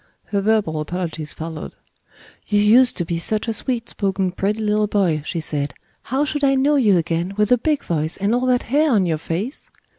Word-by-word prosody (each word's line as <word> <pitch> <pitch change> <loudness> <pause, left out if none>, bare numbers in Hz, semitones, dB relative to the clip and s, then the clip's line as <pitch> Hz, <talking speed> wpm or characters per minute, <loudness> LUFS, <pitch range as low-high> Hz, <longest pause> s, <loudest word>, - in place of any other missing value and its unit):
Her 200 -1 0
verbal 205 -7 +1
apologies 160 -1 -4
followed. 160 -1 -7 0.7
"You 205 -1 +2
used 240 +5 +5
to 175 - -1
be 165 0 -2
such 215 +6 -1
a 225 - 0
sweet 235 +1 -2
spoken 195 -2 -1
pretty 200 +4 -1
little 210 -1 +1
boy," 185 -7 +1
she 170 - -3
said, 145 -3 -3 0.3
"how 270 +4 -1
should 295 -1 -3
I 275 -1 +4
know 280 +3 +3
you 215 -9 +4
again, 170 +3 -1
with 210 +1 +1
a 250 - +6
big 300 +3 0
voice 160 -1 -2
and 200 +3 0
all 250 +1 +1
that 250 -1 +2
hair 295 +6 +2
on 200 -4 +3
your 160 -3 -1
face?" 190 - -4
205 Hz, 205 wpm, -21 LUFS, 170-245 Hz, 0.7 s, a